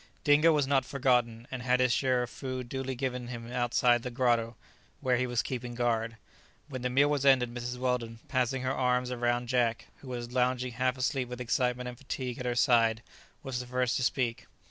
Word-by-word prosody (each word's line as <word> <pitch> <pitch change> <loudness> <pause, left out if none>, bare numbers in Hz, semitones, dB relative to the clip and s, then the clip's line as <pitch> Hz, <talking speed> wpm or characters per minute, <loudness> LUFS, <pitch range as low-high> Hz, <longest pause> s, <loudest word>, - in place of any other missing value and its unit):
Dingo 150 +2 +5
was 150 -3 +2
not 135 -1 +2
forgotten, 125 -3 0
and 130 -1 -4
had 125 0 +2
his 125 -2 +3
share 130 -2 +2
of 125 - -7
food 130 -2 -5
duly 135 +1 -4
given 125 -1 -3
him 120 -1 -7
outside 120 0 +2
the 125 - -4
grotto, 120 -2 +1 0.4
where 125 -1 +1
he 125 +1 0
was 120 -2 0
keeping 125 -2 -5
guard. 115 -1 0 0.5
When 130 -4 -6
the 125 - -1
meal 140 +3 +4
was 145 -2 0
ended, 130 -3 +4
Mrs. 120 +1 -4
Weldon, 125 -3 -1
passing 130 0 0
her 130 +1 0
arms 125 -1 +1
round 120 0 0
Jack, 120 -2 0
who 135 - -14
was 120 -1 -5
lounging 125 0 0
half 125 +2 0
asleep 130 0 -1
with 125 0 -6
excitement 125 0 0
and 125 -1 -8
fatigue 130 -3 -5
at 125 - -3
her 120 - 0
side, 115 -3 +3 0.4
was 135 -3 -3
the 125 - -6
first 125 0 0
to - - -2
speak. 120 -2 -1
125 Hz, 205 wpm, -30 LUFS, 120-130 Hz, 0.5 s, Dingo